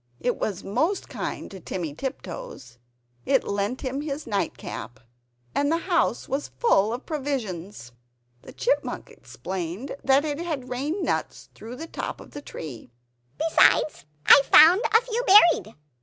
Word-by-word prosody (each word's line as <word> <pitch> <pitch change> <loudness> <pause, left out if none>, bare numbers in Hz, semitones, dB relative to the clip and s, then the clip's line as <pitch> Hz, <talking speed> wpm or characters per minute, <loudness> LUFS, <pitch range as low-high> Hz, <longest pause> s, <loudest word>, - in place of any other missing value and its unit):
It 245 - -1
was 200 -4 -3
most 310 - -1
kind - - -5
to 195 - -9
Timmy 170 -3 -5
Tiptoes; 155 - -7 0.4
it 270 -2 +2
lent 200 +5 -2
him 270 +1 -3
its 295 0 -5
nightcap; 130 - -4 0.5
and 285 +1 +1
the 330 - +2
house 340 - 0
was 275 +2 -2
full 215 - +3
of 245 +3 -5
provisions. 210 - -4 0.5
The - - -12
Chipmunk - - -2
explained 185 +6 -6
that 275 +2 +3
it 295 0 -3
had 310 -7 -4
rained 290 +10 -2
nuts - - -3
through 230 +3 -9
the 320 - -7
top - - -6
of - - -13
the 290 - -8
tree 135 - -9 0.5
"Besides, 310 - +3 0.2
I 285 - +9
found 345 +7 +8
a 450 - +6
few 480 0 -3
buried!" 345 - +6
265 Hz, 145 wpm, -25 LUFS, 195-310 Hz, 0.5 s, I